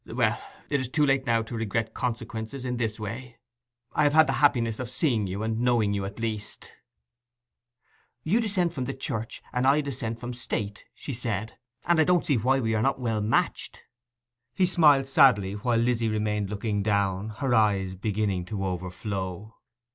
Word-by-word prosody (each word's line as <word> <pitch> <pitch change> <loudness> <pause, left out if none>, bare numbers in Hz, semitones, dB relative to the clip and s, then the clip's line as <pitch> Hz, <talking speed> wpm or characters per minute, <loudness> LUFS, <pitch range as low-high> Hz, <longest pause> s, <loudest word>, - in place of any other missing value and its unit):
Well, - - 0 0.3
it 140 - +2
is 130 -2 -3
too 150 +2 +2
late 135 -1 +1
now 115 -1 +2
to 115 +2 -7
regret 110 0 -2
consequences 115 +1 -4
in 125 -1 -2
this 110 -2 -2
way. 115 +3 -6 0.6
I - - +1
have 145 0 +3
had 160 0 +7
the - - -1
happiness 120 -6 +3
of 125 -3 -4
seeing 125 -5 0
you 95 +3 -4
and 110 0 -1
knowing 120 -4 +2
you 100 -1 -2
at 100 +3 -7
least.' 110 -2 -4 1.5
'You 210 +9 +2
dissent 190 -6 0
from 130 -6 -3
Church, 110 0 -4
and 125 +1 +1
I 140 +2 +5
dissent 115 -5 -4
from 125 +1 -5
State,' 105 -4 -4
she 140 - -6
said. 115 -3 -4 0.3
'And 175 -2 +3
I - - +7
don't 180 +1 +2
see 140 - +2
why 130 +5 +2
we 110 -3 0
are 110 - +1
not 135 +3 +1
well 115 -4 -1
matched.' 105 +2 -1 0.7
He 185 - +3
smiled 150 -7 +5
sadly, 110 -8 +5
while 115 +3 0
Lizzy 115 -1 +1
remained 105 -2 -1
looking 105 0 -2
down, 100 -1 0
her 135 -3 0
eyes 100 -4 +2
beginning 100 -2 -1
to 95 0 -3
overflow. 95 +2 -4
115 Hz, 175 wpm, -27 LUFS, 105-130 Hz, 1.5 s, had